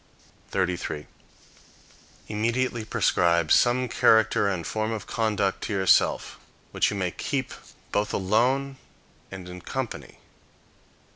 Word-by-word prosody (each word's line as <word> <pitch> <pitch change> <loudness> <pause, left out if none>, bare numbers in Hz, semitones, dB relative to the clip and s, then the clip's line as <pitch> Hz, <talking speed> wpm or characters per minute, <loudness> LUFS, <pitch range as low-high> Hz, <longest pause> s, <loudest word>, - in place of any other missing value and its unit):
33. 90 -5 -2 1.2
Immediately 115 +2 -1
prescribe 85 -6 +2
some 125 +1 +4
character 110 -3 +3
and 90 -4 -3
form 110 0 -2
of 110 -3 -4
conduce 105 -3 0
to 110 - -3
yourself, 95 -1 +2 0.3
which - - +2
you 105 - -4
may 90 -2 -1
keep 135 +6 -3 0.4
both 105 +1 0
alone 125 +8 +1 0.5
and 95 -2 -9
in 90 0 -9
company. 130 +6 -5
105 Hz, 110 wpm, -26 LUFS, 95-120 Hz, 1.2 s, some